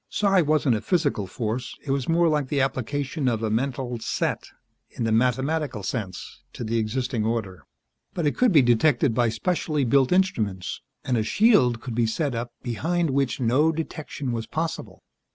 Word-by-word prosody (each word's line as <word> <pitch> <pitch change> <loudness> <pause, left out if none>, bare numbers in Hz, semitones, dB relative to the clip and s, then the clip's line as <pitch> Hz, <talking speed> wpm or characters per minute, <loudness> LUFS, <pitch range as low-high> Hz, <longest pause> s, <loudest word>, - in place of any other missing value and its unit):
Psi 195 -3 +3
wasn't 150 -5 +2
a 105 - -2
physical 145 - 0
force; 115 +5 -4
it 135 - -2
was 135 0 -1
more 170 +1 +4
like 150 -3 +1
the 140 +1 -1
application 135 +2 -1
of 115 -2 0
a 110 - 0
mental 125 0 -2
"set," - - -2 0.4
in - - -5
the 115 - 0
mathematical 130 +1 0
sense, 95 -4 -5
to - - -6
the 115 +1 0
existing 115 +1 -1
order. 110 -5 -3 0.5
But 170 - -1
it 145 - +1
could 250 -3 +3
be 150 -7 +6
detected 120 +1 +3
by 120 0 +2
specially 150 +4 -1
built 130 +2 +3
instruments 115 - 0 0.2
and 125 -2 0
a 110 - +1
shield 160 - +3
could 125 -1 -6
be 115 0 +1
set 140 +4 -1
up 120 +1 -4
behind 165 +7 -1
which 135 -1 0
no 130 +6 +3
detection 150 -4 -5
was 115 -1 -3
possible. 160 +1 -4
130 Hz, 175 wpm, -25 LUFS, 115-155 Hz, 0.5 s, be